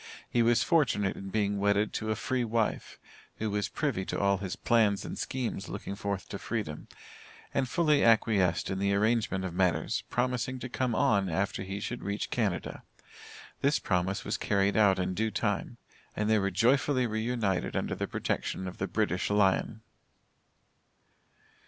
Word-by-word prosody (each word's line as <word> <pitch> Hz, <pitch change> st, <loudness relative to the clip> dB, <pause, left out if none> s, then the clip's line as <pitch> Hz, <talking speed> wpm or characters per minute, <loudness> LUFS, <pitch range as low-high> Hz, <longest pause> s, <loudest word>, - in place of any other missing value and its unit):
He 120 Hz, -, +1 dB
was 115 Hz, 0 st, +4 dB
fortunate 115 Hz, -, +2 dB
in 95 Hz, -, -7 dB
being 100 Hz, 0 st, 0 dB
wedded 100 Hz, +1 st, +2 dB
to 110 Hz, -, -3 dB
a 110 Hz, -, +1 dB
free 125 Hz, +3 st, -1 dB
wife, 115 Hz, -1 st, -1 dB, 0.4 s
who 110 Hz, -1 st, -3 dB
was 105 Hz, 0 st, -1 dB
privy 140 Hz, -11 st, -1 dB
to -, -, -3 dB
all 100 Hz, -1 st, +2 dB
his 95 Hz, -2 st, -4 dB
plans 110 Hz, -4 st, +2 dB
and -, -, -5 dB
schemes 125 Hz, -6 st, -3 dB
looking -, -, -5 dB
forth 100 Hz, -1 st, -4 dB
to 100 Hz, -, -5 dB
freedom, 105 Hz, -10 st, -4 dB, 0.7 s
and 130 Hz, -2 st, 0 dB
fully 150 Hz, -1 st, +3 dB
acquiesced 105 Hz, -7 st, +3 dB
in 95 Hz, -, -2 dB
the 100 Hz, 0 st, +2 dB
arrangement 105 Hz, -3 st, +1 dB
of 90 Hz, -, -4 dB
matters, 90 Hz, -1 st, +1 dB
promising 125 Hz, +1 st, -1 dB
to 125 Hz, 0 st, -6 dB
come 125 Hz, -1 st, -1 dB
on 100 Hz, -9 st, +2 dB
after 95 Hz, +5 st, -1 dB
he 95 Hz, +1 st, -4 dB
should 120 Hz, +4 st, -4 dB
reach 100 Hz, +1 st, -3 dB
Canada. 100 Hz, -8 st, -1 dB, 0.8 s
This 140 Hz, +2 st, +3 dB
promise 95 Hz, +1 st, -1 dB
was 105 Hz, -, -1 dB
carried 100 Hz, -1 st, +1 dB
out 100 Hz, -3 st, +5 dB
in 90 Hz, 0 st, -1 dB
due 110 Hz, +4 st, 0 dB
time, -, -, -2 dB, 0.4 s
and 105 Hz, -, -1 dB
they 110 Hz, 0 st, +4 dB
were 100 Hz, 0 st, +1 dB
joyfully 125 Hz, +6 st, +2 dB
re 110 Hz, -1 st, -2 dB
united 110 Hz, -6 st, -1 dB
under -, -, -1 dB
the -, -, -3 dB
protection 95 Hz, -, -2 dB
of 95 Hz, -, -8 dB
the 95 Hz, -, -1 dB
British 95 Hz, -1 st, 0 dB
Lion. 105 Hz, +2 st, +2 dB
105 Hz, 170 wpm, -29 LUFS, 95-115 Hz, 0.8 s, out